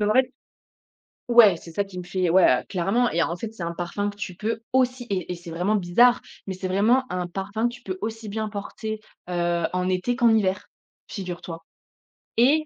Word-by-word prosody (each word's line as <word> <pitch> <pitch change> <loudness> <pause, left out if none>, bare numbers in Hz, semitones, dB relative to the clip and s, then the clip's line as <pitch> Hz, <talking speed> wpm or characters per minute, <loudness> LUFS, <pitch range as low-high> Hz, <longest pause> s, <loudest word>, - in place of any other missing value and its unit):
Donc 210 0 +2
en - - +2
fait 260 0 +3 1.0
ouais 225 -7 +7
c'est 165 - -12
ça 200 - 0
qui 190 -2 -9
me - - -6
fait 185 0 -2
ouais 175 - +3
voilà, 180 +1 +5
clairement 200 +6 +1
et 165 - +1
en 170 +1 0
fait 225 +4 -6
c'est 210 - -11
un 170 0 -3
parfum 180 +4 -2
que 205 - -9
tu 185 -3 -5
peux 220 +3 -2
aussi 255 -1 +2
et 185 -3 -2
et - - -2
c'est 170 0 -11
vraiment 180 +6 +1
bizarre, 225 +6 +4 0.3
mais 190 - -2
c'est 185 0 -4
vraiment 225 +7 +3
un 180 -1 -2
parfum 200 +6 -2
que - - -10
tu 245 - -13
peux 185 -1 -4
aussi 220 0 -4
bien 215 +1 -2
porter, 215 +1 -5 0.3
heu, 175 -1 0
en 180 0 0
été 185 +7 0
qu'en 240 -2 +4
hiver 190 -3 0 0.4
figure-toi 175 -3 -6 0.7
et 285 +7 +4
200 Hz, 215 wpm, -25 LUFS, 180-225 Hz, 1.0 s, ouais